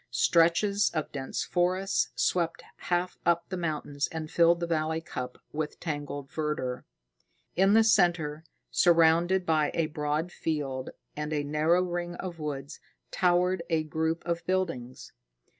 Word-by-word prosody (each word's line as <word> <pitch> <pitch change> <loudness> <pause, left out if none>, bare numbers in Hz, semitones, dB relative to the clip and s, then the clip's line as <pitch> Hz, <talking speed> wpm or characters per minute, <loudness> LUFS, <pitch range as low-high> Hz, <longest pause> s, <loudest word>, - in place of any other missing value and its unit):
Stretches 190 +5 +3
of 155 - -2
dense 135 -2 -3
forest 185 +2 +1
swept 170 -2 0 0.3
half 175 +1 0
up 170 0 +2
the 190 - -3
mountains 150 -4 -2
and 160 -1 -6
filled 170 0 +4
the 170 - -1
valley 160 -1 0
cup 125 -6 -6 0.2
with 150 0 -3
tangled 145 -3 -4
verdure. 150 -5 -3 0.7
In 195 +3 +4
the 225 - +7
center, 165 -7 +2 0.3
surrounded 170 +2 +4
by 155 -2 +2
a 165 - +2
broad 150 +2 -2
field 140 -6 -3 0.3
and 150 +1 -4
a 150 -1 0
narrow 155 +5 +2
ring 175 -1 -3
of 175 -2 -6
woods, 145 -1 -5 0.3
towered 180 0 +2
a 160 -2 +1
group 160 +2 -2
of 170 -1 -2
buildings. 165 -10 -2
165 Hz, 140 wpm, -28 LUFS, 150-175 Hz, 0.7 s, the